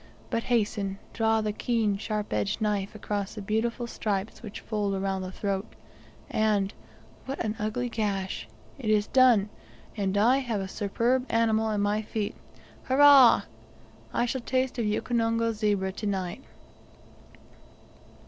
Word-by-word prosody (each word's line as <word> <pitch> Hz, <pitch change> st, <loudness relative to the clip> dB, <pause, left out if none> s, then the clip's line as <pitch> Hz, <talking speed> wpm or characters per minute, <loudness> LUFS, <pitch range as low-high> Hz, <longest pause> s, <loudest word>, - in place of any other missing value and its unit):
but, 230 Hz, -, +1 dB
hasten, 205 Hz, -4 st, 0 dB, 0.2 s
draw 225 Hz, -1 st, +2 dB
the 210 Hz, -1 st, -1 dB
keen 220 Hz, -2 st, 0 dB
sharp 210 Hz, +1 st, -3 dB
edged 105 Hz, -2 st, 0 dB
knife 205 Hz, -2 st, -1 dB
across 205 Hz, -1 st, -3 dB
the -, -, -6 dB
beautiful 230 Hz, +4 st, -1 dB
stripes 210 Hz, -3 st, -3 dB
which 215 Hz, -3 st, -8 dB
fold 205 Hz, -3 st, -1 dB
around 195 Hz, 0 st, -1 dB
the 185 Hz, 0 st, -5 dB
throat; 195 Hz, +1 st, -3 dB, 0.5 s
and 210 Hz, -2 st, +1 dB, 0.5 s
what 270 Hz, -, -4 dB
an 215 Hz, 0 st, -2 dB
ugly 215 Hz, +4 st, -1 dB
gash! 205 Hz, -5 st, -2 dB, 0.3 s
it 230 Hz, -5 st, -3 dB
is 210 Hz, -1 st, +3 dB
done, 245 Hz, -6 st, +5 dB, 0.5 s
and 200 Hz, -2 st, -1 dB
1 235 Hz, +6 st, +4 dB
have 235 Hz, -6 st, -2 dB
a 190 Hz, -, -3 dB
superb 230 Hz, +6 st, 0 dB
animal 220 Hz, -1 st, +2 dB
at 210 Hz, -1 st, 0 dB
my 205 Hz, +1 st, +1 dB
feet. 215 Hz, -1 st, -3 dB, 0.5 s
Hurrah! 275 Hz, -1 st, +7 dB, 0.7 s
I 240 Hz, -, +1 dB
shall 255 Hz, +1 st, -2 dB
taste 255 Hz, +1 st, -1 dB
of 230 Hz, -, 0 dB
Ukonongo 230 Hz, +1 st, +1 dB
zebra 205 Hz, -3 st, 0 dB
to 210 Hz, +2 st, -5 dB
night. 190 Hz, +3 st, -2 dB
215 Hz, 140 wpm, -27 LUFS, 200-230 Hz, 0.7 s, Hurrah